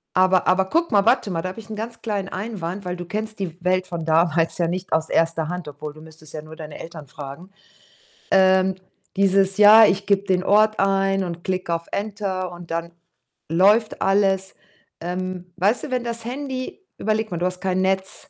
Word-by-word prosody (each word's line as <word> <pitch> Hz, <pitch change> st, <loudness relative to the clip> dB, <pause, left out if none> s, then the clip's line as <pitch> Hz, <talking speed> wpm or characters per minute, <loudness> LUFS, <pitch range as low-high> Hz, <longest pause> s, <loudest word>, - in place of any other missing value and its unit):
Aber 185 Hz, 0 st, +4 dB
aber 190 Hz, +1 st, +3 dB
gucke 335 Hz, -, 0 dB
mal 200 Hz, 0 st, +4 dB
warte 225 Hz, -5 st, +3 dB
mal, 165 Hz, -, -1 dB
da 185 Hz, -, -3 dB
habe 190 Hz, -, -8 dB
ich 215 Hz, -, -12 dB
'nen 215 Hz, -, -5 dB
ganz 225 Hz, +2 st, -6 dB
kleinen 205 Hz, -4 st, -2 dB
Einwand, 195 Hz, -2 st, -5 dB
weil 180 Hz, 0 st, -3 dB
du 175 Hz, 0 st, -7 dB
kennst 215 Hz, +2 st, -4 dB
die 175 Hz, -4 st, -4 dB
Welt 185 Hz, 0 st, +1 dB
von 170 Hz, -2 st, -5 dB
damals 165 Hz, 0 st, +2 dB
ja 170 Hz, -, +2 dB
nicht 185 Hz, +2 st, -4 dB
aus 160 Hz, 0 st, +1 dB
1. 165 Hz, -1 st, +1 dB
Hand 180 Hz, -3 st, -5 dB
obwohl, 150 Hz, +1 st, -7 dB
du 155 Hz, -, -14 dB
müsstest 155 Hz, -1 st, -14 dB
ja 155 Hz, -, -5 dB
nur 160 Hz, +1 st, -11 dB
deine 155 Hz, -2 st, -9 dB
Eltern 160 Hz, -3 st, -9 dB
fragen. 145 Hz, +5 st, -9 dB, 0.8 s
Ähm, 190 Hz, 0 st, +4 dB, 0.4 s
dieses 195 Hz, 0 st, +3 dB
Jahr, 215 Hz, +1 st, +9 dB
ich 200 Hz, +1 st, 0 dB
gebe 200 Hz, 0 st, +2 dB
den 185 Hz, -2 st, +1 dB
Ort 215 Hz, +2 st, +4 dB
ein 195 Hz, 0 st, +2 dB
und 170 Hz, -1 st, -6 dB
klick 185 Hz, -2 st, -2 dB
auf 170 Hz, 0 st, -2 dB
Enter 200 Hz, -3 st, -3 dB
und 175 Hz, -1 st, -11 dB
dann 170 Hz, +1 st, -3 dB, 0.6 s
läuft 205 Hz, +6 st, +3 dB
alles. 195 Hz, -1 st, +2 dB, 0.5 s
Ähm, 180 Hz, +1 st, -5 dB
weißt 200 Hz, +7 st, +2 dB
du, 285 Hz, -, -8 dB
wenn 250 Hz, -1 st, 0 dB
das 230 Hz, -1 st, -2 dB
Handy 260 Hz, -, -5 dB, 0.2 s
überleg 220 Hz, +1 st, -1 dB
mal, 175 Hz, -, -4 dB
du 175 Hz, -, -1 dB
hast 180 Hz, 0 st, -2 dB
kein 185 Hz, -1 st, 0 dB
Netz, 190 Hz, 0 st, -1 dB
185 Hz, 200 wpm, -22 LUFS, 170-205 Hz, 0.8 s, Jahr